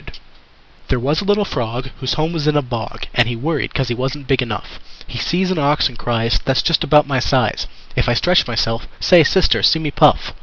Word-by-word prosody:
There 130 Hz, -, 0 dB
was 145 Hz, +8 st, 0 dB
a -, -, -6 dB
little 205 Hz, +1 st, +2 dB
Fog 125 Hz, -, -4 dB
Whose 130 Hz, -1 st, -1 dB
home 160 Hz, +2 st, -1 dB
was 155 Hz, -3 st, -2 dB
in 150 Hz, -, +2 dB
a 145 Hz, -, +1 dB
bog, 120 Hz, -3 st, -6 dB
And 120 Hz, -2 st, +3 dB
he 120 Hz, -, -3 dB
worried 150 Hz, +5 st, -2 dB
'cause 135 Hz, -3 st, 0 dB
he -, -, 0 dB
wasn't 135 Hz, +4 st, -4 dB
big 130 Hz, 0 st, +1 dB
enough. 110 Hz, -5 st, -6 dB, 0.3 s
He -, -, -7 dB
sees 185 Hz, +2 st, 0 dB
an 185 Hz, -, -1 dB
ox 145 Hz, +1 st, +2 dB
and 130 Hz, -, -10 dB
cries: 115 Hz, -3 st, -1 dB
"That's 135 Hz, -1 st, +1 dB
just 165 Hz, -, +2 dB
about 150 Hz, -1 st, +4 dB
my 135 Hz, -2 st, -1 dB
size, -, -, 0 dB, 0.3 s
If -, -, +1 dB
I 120 Hz, -, +2 dB
stretch 180 Hz, +6 st, +2 dB
myself 115 Hz, -1 st, -2 dB
Say 175 Hz, -3 st, +5 dB
Sister, 185 Hz, +5 st, +2 dB
see -, -, +4 dB
me 155 Hz, -2 st, -3 dB
puff!" -, -, +3 dB
135 Hz, 225 wpm, -18 LUFS, 120-155 Hz, 0.3 s, Say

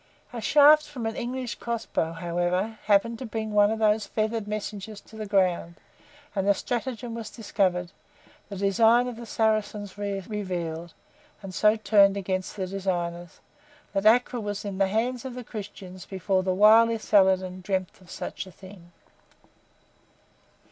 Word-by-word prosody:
A 235 Hz, -, -5 dB
shaft 300 Hz, +4 st, +6 dB
from 265 Hz, -6 st, -6 dB
an 225 Hz, -, -2 dB
English 250 Hz, 0 st, -4 dB
crossbow, 230 Hz, -8 st, -2 dB
however, 175 Hz, +5 st, -2 dB
happened 215 Hz, +3 st, +2 dB
to 260 Hz, -, -5 dB
bring 220 Hz, -1 st, -4 dB
one 205 Hz, 0 st, +5 dB
of 220 Hz, -, -1 dB
those 215 Hz, -1 st, +2 dB
feathered 220 Hz, 0 st, -2 dB
messengers 210 Hz, 0 st, -5 dB
to 220 Hz, -, -17 dB
the 215 Hz, -1 st, -6 dB
ground, 180 Hz, -4 st, +1 dB, 0.6 s
and 195 Hz, 0 st, 0 dB
the 200 Hz, -, +5 dB
stratagem 240 Hz, +1 st, -4 dB
was 225 Hz, -2 st, -6 dB
discovered, 185 Hz, -6 st, -1 dB, 0.6 s
the 200 Hz, -, -6 dB
design 225 Hz, +5 st, +3 dB
of 245 Hz, -, -5 dB
the 235 Hz, 0 st, -9 dB
Saracens 215 Hz, -3 st, -1 dB
revealed, 185 Hz, -5 st, -4 dB, 0.5 s
and 190 Hz, -1 st, -7 dB
so 210 Hz, +3 st, +4 dB
turned 200 Hz, -2 st, +4 dB
against 185 Hz, -1 st, -3 dB
the 190 Hz, -2 st, -2 dB
designers, 175 Hz, -3 st, -4 dB, 0.5 s
that 195 Hz, +1 st, +2 dB
Acre 245 Hz, +2 st, +4 dB
was 205 Hz, -1 st, -4 dB
in 200 Hz, -1 st, -5 dB
the 195 Hz, -, +4 dB
hands 235 Hz, +5 st, -1 dB
of 260 Hz, -2 st, -6 dB
the 250 Hz, -, -6 dB
Christians 195 Hz, -4 st, -9 dB
before 190 Hz, 0 st, 0 dB
the 185 Hz, 0 st, -1 dB
wily 220 Hz, +4 st, +6 dB
Saladin 190 Hz, -3 st, +2 dB
dreamt 185 Hz, 0 st, -3 dB
of 180 Hz, -, -18 dB
such -, -, -6 dB
a -, -, -12 dB
thing. 185 Hz, -1 st, -14 dB
205 Hz, 155 wpm, -26 LUFS, 185-225 Hz, 0.6 s, shaft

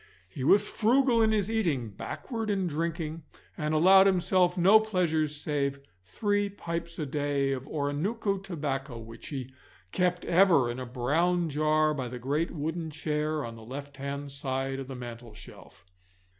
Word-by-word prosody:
He 110 Hz, +8 st, -7 dB
was 200 Hz, +8 st, +5 dB
frugal 240 Hz, +1 st, +3 dB
in 220 Hz, -1 st, +4 dB
his 215 Hz, -1 st, +1 dB
eating, 160 Hz, -, 0 dB
backward 225 Hz, -, -5 dB
in 195 Hz, -2 st, 0 dB
drinking, 165 Hz, 0 st, -3 dB, 0.3 s
and 150 Hz, 0 st, -2 dB
allowed 190 Hz, +5 st, +7 dB
himself 180 Hz, -1 st, +2 dB
no 195 Hz, +5 st, +7 dB
pleasures 165 Hz, -8 st, 0 dB
save 140 Hz, -1 st, -1 dB, 0.2 s
three 205 Hz, -, 0 dB
pipes 170 Hz, -3 st, -5 dB
a 155 Hz, -, -2 dB
day 140 Hz, -1 st, 0 dB
of 135 Hz, 0 st, -4 dB
Oronooko 185 Hz, +9 st, -1 dB
tobacco, 145 Hz, -8 st, -4 dB
which 115 Hz, 0 st, -10 dB
he 130 Hz, -3 st, -6 dB, 0.4 s
kept 180 Hz, -1 st, 0 dB
ever 170 Hz, -9 st, +4 dB
in 120 Hz, -, -6 dB
a 130 Hz, -, -5 dB
brown 160 Hz, +8 st, +1 dB
jar 155 Hz, +1 st, +2 dB
by 130 Hz, -4 st, -3 dB
the 125 Hz, +1 st, -6 dB
great 145 Hz, +7 st, -1 dB
wooden 160 Hz, +1 st, -3 dB
chair 150 Hz, -1 st, -2 dB
on 115 Hz, 0 st, -7 dB
the 115 Hz, -, -12 dB
left 140 Hz, +4 st, -8 dB
hand 140 Hz, +1 st, -5 dB
side 135 Hz, -1 st, -3 dB
of 135 Hz, -, -6 dB
the 135 Hz, -, -7 dB
mantelshelf. 115 Hz, -7 st, -11 dB
155 Hz, 155 wpm, -28 LUFS, 135-180 Hz, 0.4 s, allowed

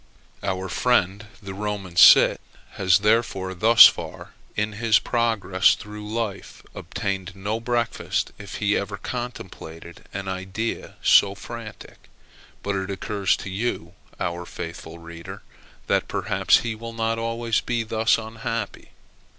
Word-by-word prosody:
Our 95 Hz, -1 st, -2 dB
friend, 105 Hz, -1 st, +1 dB, 0.2 s
the 95 Hz, -1 st, -6 dB
Roman 100 Hz, -3 st, -4 dB
cit, 85 Hz, -, +7 dB, 0.3 s
has 95 Hz, 0 st, +3 dB
therefore 105 Hz, -4 st, +1 dB
thus 110 Hz, +6 st, +8 dB
far, -, -, 0 dB, 0.2 s
in 105 Hz, +1 st, -1 dB
his 110 Hz, +1 st, +3 dB
progress 105 Hz, -4 st, +2 dB
through 105 Hz, -1 st, -9 dB
life, 110 Hz, -4 st, -4 dB
obtained 95 Hz, -2 st, -4 dB
no 105 Hz, +3 st, -3 dB
breakfast, 120 Hz, 0 st, -1 dB
if 100 Hz, -2 st, -8 dB
he 105 Hz, -1 st, +1 dB
ever 100 Hz, 0 st, -3 dB
contemplated 95 Hz, -8 st, -8 dB
an 100 Hz, -1 st, -5 dB
idea 95 Hz, +4 st, -4 dB
so 100 Hz, 0 st, +5 dB
frantic. 115 Hz, 0 st, -10 dB, 0.5 s
But 100 Hz, -1 st, -1 dB
it 95 Hz, 0 st, -4 dB
occurs 100 Hz, 0 st, 0 dB
to 95 Hz, -, -7 dB
you, 95 Hz, -4 st, -3 dB, 0.3 s
our 85 Hz, 0 st, -3 dB
faithful 85 Hz, 0 st, -8 dB
reader, 85 Hz, 0 st, -10 dB, 0.4 s
that -, -, +1 dB
perhaps -, -, +2 dB
he 115 Hz, -1 st, -3 dB
will 115 Hz, +1 st, -8 dB
not 115 Hz, 0 st, -1 dB
always 115 Hz, 0 st, -1 dB
be 120 Hz, -2 st, -1 dB
thus 110 Hz, 0 st, +2 dB
unhappy. 115 Hz, -1 st, -5 dB
105 Hz, 130 wpm, -24 LUFS, 95-115 Hz, 0.5 s, thus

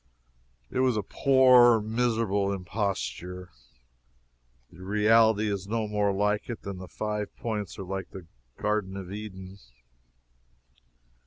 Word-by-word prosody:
It -, -, -2 dB
was 130 Hz, -3 st, +2 dB
a 105 Hz, -, -1 dB
poor, 125 Hz, -1 st, +5 dB
miserable 110 Hz, -3 st, 0 dB
imposture. 90 Hz, -, -4 dB, 1.2 s
The 90 Hz, +1 st, -15 dB
reality 110 Hz, +2 st, +3 dB
is 100 Hz, -2 st, -3 dB
no 110 Hz, 0 st, -1 dB
more 105 Hz, -1 st, +1 dB
like 105 Hz, +3 st, 0 dB
it 120 Hz, -, -6 dB
than 100 Hz, -2 st, -6 dB
the 95 Hz, -, -8 dB
Five 105 Hz, +2 st, -4 dB
Points 105 Hz, -3 st, -4 dB
are -, -, -5 dB
like 95 Hz, 0 st, -5 dB
the 95 Hz, -3 st, -10 dB, 0.3 s
Garden 105 Hz, -2 st, -1 dB
of 95 Hz, -1 st, -7 dB
Eden. 100 Hz, -2 st, -8 dB
105 Hz, 120 wpm, -27 LUFS, 95-110 Hz, 1.2 s, poor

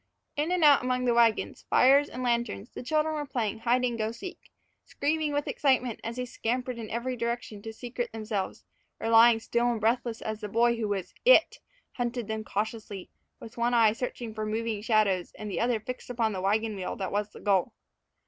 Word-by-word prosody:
In 300 Hz, +4 st, -1 dB
and 360 Hz, -2 st, +1 dB
out 290 Hz, -2 st, +7 dB
among 255 Hz, 0 st, 0 dB
the 240 Hz, -, +3 dB
wagons, 235 Hz, -2 st, +2 dB
fires, 275 Hz, +3 st, +5 dB
and 255 Hz, -, -6 dB
lanterns 235 Hz, -3 st, -1 dB
the -, -, -7 dB
children 310 Hz, +4 st, 0 dB
were 300 Hz, -1 st, -2 dB
playing 225 Hz, -5 st, -2 dB
hide 245 Hz, +2 st, +2 dB
and 240 Hz, -2 st, -2 dB
go 215 Hz, 0 st, 0 dB
seek, 350 Hz, +11 st, -9 dB, 0.3 s
screaming 305 Hz, +1 st, -1 dB
with 290 Hz, 0 st, -1 dB
excitement 255 Hz, -5 st, +1 dB
as 230 Hz, +1 st, -4 dB
they 250 Hz, 0 st, -3 dB
scampered 245 Hz, +1 st, -3 dB
in 220 Hz, -2 st, -6 dB
every 245 Hz, +2 st, -2 dB
direction 235 Hz, -3 st, -4 dB
to 225 Hz, -, -6 dB
secrete 240 Hz, +2 st, -5 dB
themselves, 215 Hz, -3 st, -4 dB, 0.3 s
or 225 Hz, -, -2 dB
lying 230 Hz, 0 st, +7 dB
still 235 Hz, +2 st, 0 dB
and 230 Hz, -, -2 dB
breathless 230 Hz, +1 st, 0 dB
as 220 Hz, -1 st, -4 dB
the 210 Hz, -, -5 dB
boy 235 Hz, +3 st, +3 dB
who 220 Hz, -2 st, -1 dB
was 200 Hz, -3 st, -3 dB
"it" -, -, +5 dB, 0.3 s
hunted 240 Hz, -2 st, -3 dB
them 220 Hz, 0 st, -3 dB
cautiously, 210 Hz, -2 st, -4 dB, 0.3 s
with 230 Hz, +2 st, -11 dB
one 240 Hz, +1 st, +2 dB
eye 225 Hz, -2 st, +5 dB
searching 235 Hz, -1 st, -5 dB
for 215 Hz, 0 st, -4 dB
moving 220 Hz, 0 st, -2 dB
shadows 210 Hz, -5 st, +1 dB
and 210 Hz, -1 st, -7 dB
the -, -, -2 dB
other 235 Hz, -1 st, +1 dB
fixed 250 Hz, +4 st, -7 dB
upon 230 Hz, -3 st, 0 dB
the 185 Hz, -, -3 dB
wagon 215 Hz, +3 st, 0 dB
wheel 190 Hz, -2 st, -4 dB
that 190 Hz, -2 st, -4 dB
was 205 Hz, +1 st, -1 dB
the -, -, -13 dB
goal. 200 Hz, +2 st, +1 dB
230 Hz, 205 wpm, -28 LUFS, 215-250 Hz, 0.3 s, out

